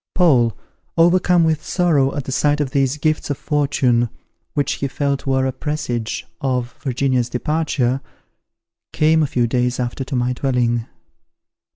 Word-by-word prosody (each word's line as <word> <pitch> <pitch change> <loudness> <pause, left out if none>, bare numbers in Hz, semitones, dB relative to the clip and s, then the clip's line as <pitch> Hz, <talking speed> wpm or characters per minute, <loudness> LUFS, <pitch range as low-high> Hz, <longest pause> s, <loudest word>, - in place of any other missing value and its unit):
Paul, 125 - +3 0.4
overcome 175 +1 +4
with 160 -1 +1
sorrow 150 -7 +1
at 145 - -2
the 130 - -6
sight 145 +3 +2
of 140 -3 -1
these 135 0 +1
gifts 155 0 0
of 145 - -1
fortune, 135 -5 +1 0.5
which 145 - +1
he 140 - +1
felt 140 0 -2
were 130 0 +2
a 130 - 0
presage 125 -6 -3 0.2
of 125 -3 -1
Virginia's 130 -2 0
departure, 135 -2 0 0.9
came 160 +1 +3
a 150 - +2
few 120 -3 +1
days 125 +1 0
after 125 +2 -2
to 135 - -4
my 125 0 +1
dwelling. 120 -3 0
135 Hz, 150 wpm, -20 LUFS, 125-150 Hz, 0.9 s, overcome